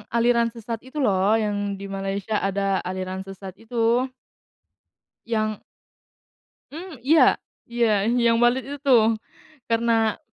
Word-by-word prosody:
aliran 235 0 +3
sesat 230 -1 -6
itu 260 +4 -11
loh, 200 -2 +2
yang 205 -1 -1 0.3
di - - -6
Malaysia 195 +2 -3
ada 195 0 0
aliran 185 0 -4
sesat 195 -1 -9
itu. 235 +2 +1 1.2
Yang 215 -2 -1 1.1
Mmm, 325 -3 -9
iya, 305 +6 +4 0.2
iya, 230 -4 +1
yang 235 -1 +3
balet 245 +2 +3
itu 285 +1 -5
tuh, 230 -5 +4 0.6
karena 225 -1 +2
225 Hz, 115 wpm, -23 LUFS, 200-240 Hz, 1.2 s, iya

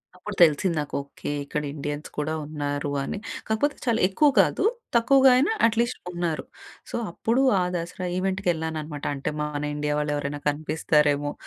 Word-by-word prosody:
అప్పుడు 195 +3 -7
తెలిసింది 170 +2 +5
నాకు. 145 - -6
ఓకే. 140 +1 -6
ఇక్కడ 150 +1 -3
ఇండియన్స్ 145 0 -5
కూడా 150 +1 -1
ఉన్నారు 145 -1 -3
అని. - - -4 0.3
కాకపోతే, 220 +7 +1
చాలా 230 -2 +2
ఎక్కువ 290 +10 +4
గాదు. - - +3 0.3
తక్కువగా 265 +3 +6
అయినా 295 +10 +3 0.2
అట్లీస్ట్ 235 +2 0
ఉన్నారు. 175 -3 -2 0.5
సో, - - -5 0.2
అప్పుడు 230 +8 +1 0.2
ఆ - - +2
దసరా 175 +2 -4
ఈవెంట్‌కి 190 +1 -1
యెళ్ళాననమాట. 155 -2 -4
అంటే 140 +2 -3
మన 150 -1 -3
ఇండియా 150 0 -1
వాళ్ళు 150 0 -1
ఎవరైనా 145 0 -3
కనిపిస్తారేమో, 150 -1 +1
155 Hz, 150 wpm, -25 LUFS, 145-195 Hz, 0.5 s, తక్కువగా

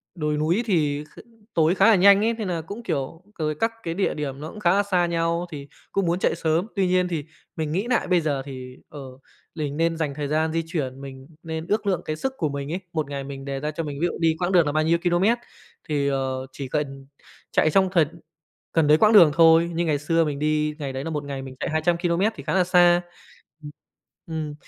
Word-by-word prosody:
đồi 150 -2 -1
núi 170 +10 +1
thì 150 -7 0
kh - - -12 0.3
tối 165 +2 +3
khá 195 - +4
là 225 - +7
nhanh 200 +2 +6
ấy, 230 - +2
nên 220 -4 -4
nà 170 -2 -2
cũng, 200 +9 -8
kiểu 160 -3 -3 0.2
rồi 155 -1 -1
các 225 +7 0
cái 165 - -3
địa 195 +3 0
điểm 140 -3 -5
nó 155 +2 -6
cũng 215 - -10
khá 175 -3 +3
là 200 +1 +3
xa 180 -3 +1
nhau 170 0 0
thì 140 -2 -7 0.2
cũng 195 -2 0
muốn 170 +2 0
chạy - - +1
sớm. 165 +4 0
Tuy 195 -2 +2
nhiên 180 0 +2
thì 165 -4 -3 0.3
mình 155 -2 -3
nghĩ 195 +8 -1
nại 245 - +1
bây 180 -2 +3
giờ 145 -4 -1
thì, 130 -2 -9
ờ, 145 - -10 0.6
mình 150 -3 -3
nên 165 0 +1
dành 155 -3 -2
thời 145 0 -4
gian 155 +2 0
di 165 - 0
chuyển, 135 -5 -4
mình 135 -1 -10 0.2
nên 160 0 -5
ước 210 0 0
lượng 180 -3 +1
cái 155 - -2
sức 265 +12 -3
của 155 -5 0
mình 140 +1 -5
ấy, 175 - -2
một 155 -3 -2
ngày 140 -1 -4
mình 135 0 -8
đề 135 -1 -3
ra 150 +2 -3
cho 160 +2 -4
mình 145 -1 -6
ví 175 - +3
dụ - - -5
đi 165 -1 +2
quãng 180 +1 0
đường 175 -3 +5
là 145 - 0
bao 155 +1 +1
nhiêu 165 +2 +3
ki-lô-mét 180 +7 +2 0.5
thì, 145 -2 0
ờ, 130 -1 -2
chỉ 135 0 -6
cần 135 -1 -4 0.4
chạy - - +3
trong 190 +4 +3
thần 165 -2 +1 0.5
cần 160 -3 +2
đấy 150 +1 +6
quãng 215 +5 +4
đường 170 -8 +8
thôi. 165 +1 +5
Như 170 +1 0
ngày 155 -3 +1
xưa 165 +3 +1
mình 145 -2 -3
đi, 150 0 0
ngày 140 -3 -4
đấy 135 +1 -4
là 165 - -4
một 150 -2 -3
ngày 140 -1 -5
mình 130 -1 -9
chạy - - -2
200 160 +2 +1
ki-lô-mét 175 +5 +1
thì - - -9
khá - - -2
là 185 -1 +4
xa. 175 -1 +5 0.6
Ừm, 150 - -8 0.6
ừm, 155 -2 -4
160 Hz, 250 wpm, -24 LUFS, 145-175 Hz, 0.6 s, đường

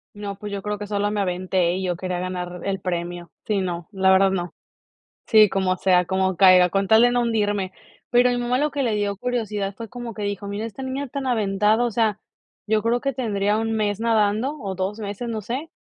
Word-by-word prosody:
No, 200 -1 -6
pues 205 0 -7
yo 200 - -3
creo 210 0 -3
que 205 - -6
sola 205 0 -1
me 210 -1 -1
aventé 180 -1 0
y 190 +1 -3
yo 180 -1 -1
quería 180 0 -3
ganar 180 -1 -5
el 195 -1 -1
premio. 175 -1 -4 0.2
Sí, 205 -3 +1
no, 175 -2 -4
la 190 -1 +3
verdad 190 +1 +5
no 175 -2 -3 0.7
sí, 215 -2 +6
como 185 -1 0
sea, 180 -1 +3
como 190 0 0
caiga, 185 -2 +6
con 195 -1 0
tal 220 +1 +6
de 245 0 +5
no 245 - +2
hundirme. 205 -4 0 0.4
Pero 245 0 +4
a - - +1
mi 245 - -1
mamá 245 +1 0
lo 300 +1 0
que 285 -1 -1
le 225 -4 0
dio 200 -1 -1
curiosidad 215 -4 -2
fue 230 -2 -7
como 240 -1 -7
que 210 - -7
dijo: 200 0 -4
"Mira, 205 +2 -4
esta 230 +4 -8
niña 265 +2 -3
tan 265 +1 -4
aventada", 210 0 +2
o 235 - -1
sea, 215 -2 +1 0.5
yo 215 0 +1
creo 235 +1 +1
que 275 0 -1
tendría 210 -4 0
1 225 0 -1
mes 210 -1 -1
nadando, 225 +5 +1
o 195 -6 -4
2 190 +4 -3
meses, 210 +3 -5
no 220 -2 -3
sé, 255 +10 -5
205 Hz, 230 wpm, -23 LUFS, 190-230 Hz, 0.7 s, sí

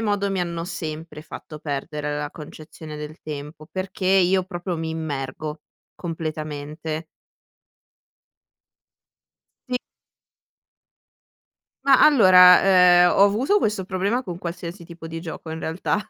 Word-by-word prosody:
modo 205 -2 0
mi 195 -1 -1
hanno 170 -1 -3
sempre 160 -3 -6
fatto 155 0 -10
perdere 150 0 -4
la 145 0 -4
concezione 155 0 -10
del 150 +1 -8
tempo, 150 +1 -8
perché 185 0 -4
io 185 0 +4
proprio 175 -1 -5
mi 160 0 -3
immergo, 150 -1 -5 0.3
completamente 155 -1 -5 2.6
Sì. 250 - 0 2.1
Ma, 270 -2 +6
allora, 185 -10 +8
ehm, 180 -2 +6
ho 195 - +5
avuto 230 - +3
questo 210 - -1
problema 200 +7 -1
con 175 -6 -6
qualsiasi 175 +1 -7
tipo 170 -1 -10
di 165 0 -6
gioco 160 -1 -8
in 160 - -5
realtà, 160 +6 -1
170 Hz, 115 wpm, -23 LUFS, 155-185 Hz, 2.6 s, allora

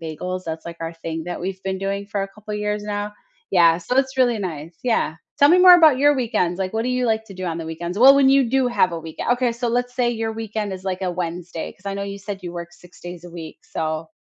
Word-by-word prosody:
bagels, 180 +3 -5
that's, 160 0 -5
like, 170 0 -8
our 165 0 -4
thing 165 -1 -5
that 175 +1 -5
we've 190 +1 -4
been 190 0 -1
doing 200 +1 -3
for 200 -1 -2
a 195 - -4
couple 210 +1 -8
years 210 0 -2
now. 205 0 -3 0.4
Yeah, 170 -2 +5
so, 180 +9 -3
it's 265 0 +1
really 245 -3 +3
nice, 165 -4 -6
yeah. 225 -10 0 0.2
Tell 285 - +6
me 350 +4 +6
more 365 0 +10
about 315 -6 +6
your 290 +1 +5
weekends, 215 -8 0
like, 185 -1 -2
what 220 0 0
do - - -1
you 250 0 0
like 220 -1 0
to 200 -3 -12
do 185 0 -6
on 165 -2 -2
the 165 - -5
weekends? 170 +4 -5
Well, 265 +4 +9
when 275 -1 +5
you 270 -2 +4
do 265 +1 +2
have 185 -7 +2
a 165 - -4
week 160 -1 -10
uh, - - +2
okay, 245 0 +1
so, 240 +1 -3
let's 245 +1 -1
say 245 -1 +1
your 225 -1 -2
weekend 215 -2 -4
is, 185 0 -7
like, 190 0 -3
a 185 - 0
Wednesday, 175 -1 -5
'cause 195 - -19
I 200 - -2
know 200 0 -3
you 200 0 -6
said 200 0 -6
you 175 -1 -6
work 170 -1 -6
6 180 +1 -18
days 175 0 -9
a 175 - -10
week, 165 -2 -9
so 160 0 -3
195 Hz, 280 wpm, -22 LUFS, 175-235 Hz, 0.4 s, more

